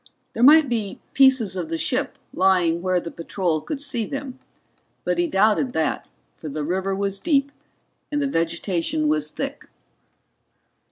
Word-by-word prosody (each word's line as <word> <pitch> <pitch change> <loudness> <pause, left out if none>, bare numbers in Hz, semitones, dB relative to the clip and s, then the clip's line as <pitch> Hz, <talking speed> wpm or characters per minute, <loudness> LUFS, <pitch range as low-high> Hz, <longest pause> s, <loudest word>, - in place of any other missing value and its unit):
There 230 - -4
might 300 +4 +7
be 220 -5 -3
pieces 260 -8 +4
of 175 -4 -4
the 165 - -2
ship - - -1 0.2
lying 180 -3 +2
where 185 0 +1
the 170 - -7
patrol 165 -1 -2
could 295 - -5
see 265 -5 -2
them. 275 -2 -6 0.6
But - - -1
he 350 - +2
doubted 220 +1 +2
that, 160 -2 -1 0.3
for 155 - -8
the 150 +1 -4
river 190 +4 -1
was 195 0 -2
deep 280 -2 +1 0.6
and 290 - 0
the 285 - 0
vegetation 165 - -1
was 155 0 +1
thick. - - -6
195 Hz, 155 wpm, -23 LUFS, 165-265 Hz, 0.6 s, might